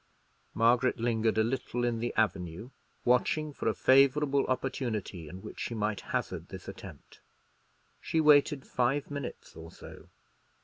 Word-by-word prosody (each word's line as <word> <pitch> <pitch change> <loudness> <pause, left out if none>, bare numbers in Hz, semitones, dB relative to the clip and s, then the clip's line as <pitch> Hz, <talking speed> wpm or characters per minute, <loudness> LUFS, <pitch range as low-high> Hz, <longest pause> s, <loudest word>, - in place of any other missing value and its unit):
Margaret 120 +3 +3
lingered 115 -2 0
a 110 - +4
little 120 0 -2
in 120 -1 -1
the 120 +1 -2
avenue, 95 +1 -1 0.3
watching 145 +5 +2
for - - -4
a 110 - +1
favourable 140 +4 +4
opportunity 120 - -3
in 95 +4 -10
which - - -9
she 120 - -3
might 105 -1 -1
hazard - - -3
this - - -9
attempt. - - -11 0.8
She 160 - -1
waited 150 -2 +4
five 135 +4 0
minutes 140 0 -7
or 80 +1 -10
so. - - -13
120 Hz, 140 wpm, -30 LUFS, 110-135 Hz, 0.8 s, a